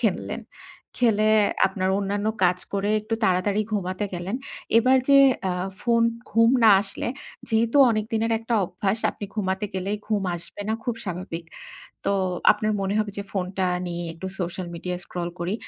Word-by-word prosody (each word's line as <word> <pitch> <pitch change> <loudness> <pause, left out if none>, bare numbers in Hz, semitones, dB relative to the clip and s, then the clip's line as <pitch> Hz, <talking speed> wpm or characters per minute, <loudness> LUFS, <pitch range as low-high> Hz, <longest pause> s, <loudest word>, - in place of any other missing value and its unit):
খেললেন। - - -1 0.6
খেলে 215 -3 +3 0.4
আপনার 190 -2 -1
অন্যান্য 205 +1 -2 0.2
কাজ 180 0 +3
করে 200 +1 0
একটু 215 +2 -3
তাড়াতাড়ি 195 +3 +2
ঘুমাতে 185 0 -1
গেলেন। 185 +7 -3 0.4
এবার 255 +3 +4
যে 275 0 +7 0.3
আ - - 0 0.3
ফোন 230 -1 +2 0.3
ঘুম 230 +1 +5
না 220 - +8
আসলে 195 +3 -5 0.4
যেহেতু 230 +4 +2
অনেকদিনের 225 +1 0
একটা 230 +1 -2
অভ্যাস 195 +4 -2
আপনি 205 - -8
ঘুমাতে 190 -1 -1
গেলেই 195 +3 -1
ঘুম 210 -2 0
আসবে 175 +4 -8
না 220 - +1
খুব 240 - -1
স্বাভাবিক। 175 -2 -5 0.6
তো, - - +2 0.4
আপনার 215 0 -1
মনে 195 +1 -1
হবে 210 -1 0
যে - - -2
ফোনটা 190 -1 -1 0.2
নিয়ে 175 0 -4
একটু 190 +3 -7
সোশ্যাল 180 +1 -3
মিডিয়া 180 +1 -4
স্ক্রল 175 -1 -4
করি। 175 +4 -2
200 Hz, 155 wpm, -24 LUFS, 185-220 Hz, 0.6 s, না